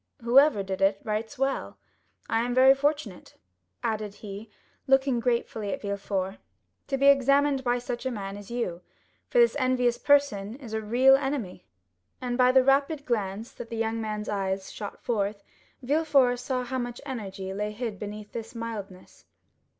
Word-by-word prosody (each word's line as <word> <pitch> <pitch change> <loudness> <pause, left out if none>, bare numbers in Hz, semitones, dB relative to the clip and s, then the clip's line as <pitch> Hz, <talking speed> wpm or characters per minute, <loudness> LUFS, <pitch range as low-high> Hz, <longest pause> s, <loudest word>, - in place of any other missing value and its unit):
Whoever 250 -2 +5
did 190 0 -4
it 195 0 +3
writes 220 +5 -3
well. 270 +1 -2 0.5
I 225 - +1
am 245 +1 -1
very 260 +1 +8
fortunate," 285 -8 -2 0.5
added 215 -2 -2
he, 210 +1 -9 0.4
looking 270 -2 +3
gratefully 235 -3 -1
at 275 - -4
Villefort, 200 -1 -3 0.5
"to 270 - -1
be 275 - +1
examined 280 0 +4
by 245 -1 +1
such 245 +1 -4
a - - 0
man 200 -5 -5
as 205 -1 -10
you; 230 -8 -3 0.5
for - - -2
this 475 -6 +5
envious 250 -2 +1
person 255 -8 +2
is 250 -5 -10
a 220 - -1
real 250 +5 +5
enemy." 270 -10 -3 0.5
And 245 -1 -2
by 250 0 +5
the 260 0 +5
rapid 280 +2 +2
glance 215 -2 -2
that 235 - -9
the 230 - -5
young 225 0 -1
man's 215 -1 -4
eyes 195 -1 -2
shot 205 -2 -8
forth, 205 -3 -1 0.4
Villefort 275 -3 +3
saw 255 0 -2
how 260 +1 -3
much 240 -1 -4
energy 195 -7 -5
lay 210 +2 -2
hid 215 -2 -5
beneath 210 0 -7
this 230 +1 -7
mildness. 210 -5 -7
235 Hz, 165 wpm, -27 LUFS, 205-265 Hz, 0.5 s, very